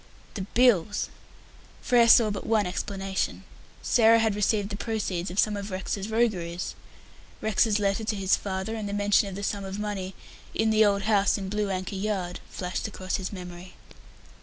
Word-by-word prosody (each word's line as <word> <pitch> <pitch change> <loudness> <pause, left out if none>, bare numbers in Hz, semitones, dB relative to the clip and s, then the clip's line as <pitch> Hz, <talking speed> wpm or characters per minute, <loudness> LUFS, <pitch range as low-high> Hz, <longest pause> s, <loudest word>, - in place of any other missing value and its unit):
"The 190 -3 -5
bills!" 215 -5 +3 0.7
Frere 240 -2 +5
saw 225 -2 +7
but 200 - -5
one 215 -2 +3
explanation. 195 +1 -3 0.4
Sarah 230 -1 +5
had 220 -2 +2
received 205 0 +1
the 200 - -4
proceeds 200 -5 -2
of 180 - -8
some 210 0 +3
of 200 0 -5
Rex's 195 +2 -3
rogueries. 185 -7 -1 0.7
Rex's 220 0 +2
letter 200 +1 0
to 215 0 -1
his 195 -1 +2
father 190 +2 -4
and 215 -2 -4
the - - -4
mention 205 0 +3
of 190 - -7
the 200 - -6
sum 200 0 -2
of 195 0 -5
money 200 -3 -4 0.4
"in 220 0 +2
the 220 0 +5
old 200 -1 +2
house 205 -1 +3
in 195 -2 -5
Blue 210 0 -1
Anchor 185 0 -3
Yard" 190 -3 -2
flashed 180 +3 -4
across 185 -3 -3
his 185 -2 -5
memory. 180 -1 -9
200 Hz, 175 wpm, -27 LUFS, 190-215 Hz, 0.7 s, saw